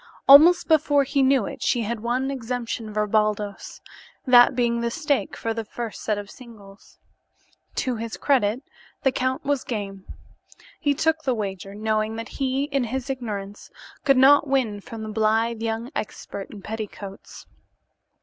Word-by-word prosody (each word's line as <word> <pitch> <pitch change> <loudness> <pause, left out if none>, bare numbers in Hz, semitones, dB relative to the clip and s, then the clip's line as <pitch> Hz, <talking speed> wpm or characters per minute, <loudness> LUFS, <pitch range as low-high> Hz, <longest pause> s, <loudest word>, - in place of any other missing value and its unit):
Almost 310 +6 +8
before 290 -3 +3
he 275 +1 0
knew 265 -4 +3
it - - -7
she 240 -2 +1
had 230 +1 -3
won 250 +4 -1
exemption 240 -3 -4
for 210 0 0
Baldos, 210 -1 -1 0.4
that 245 -2 +6
being 235 -1 +1
the 235 - 0
stake 285 -5 -1
for 225 - -2
the 225 0 -4
first 230 +1 -7
set 215 -2 -1
of 205 0 -7
singles. 210 -6 -15 0.8
To 250 -3 -1
his 230 0 -5
credit, 250 -3 +1 0.4
the 265 - +3
count 260 0 -1
was 285 -2 0
game. 195 -4 -5 0.7
He 285 -1 +1
took 320 +2 +1
the 260 -4 0
wager, 195 -2 -5
knowing 215 +1 -1
that 225 +1 -6
he, 270 0 -1
in 275 -3 -1
his 265 +3 -3
ignorance, 205 -6 -6 0.3
could 275 -2 +4
not 285 +3 +6
win 250 -7 0
from 225 +2 -8
the 215 - -6
blithe 220 +1 +1
young 225 +3 -3
expert 200 -1 -6
in 205 -3 -11
petticoats. 210 -2 -8
230 Hz, 160 wpm, -24 LUFS, 215-265 Hz, 0.8 s, Almost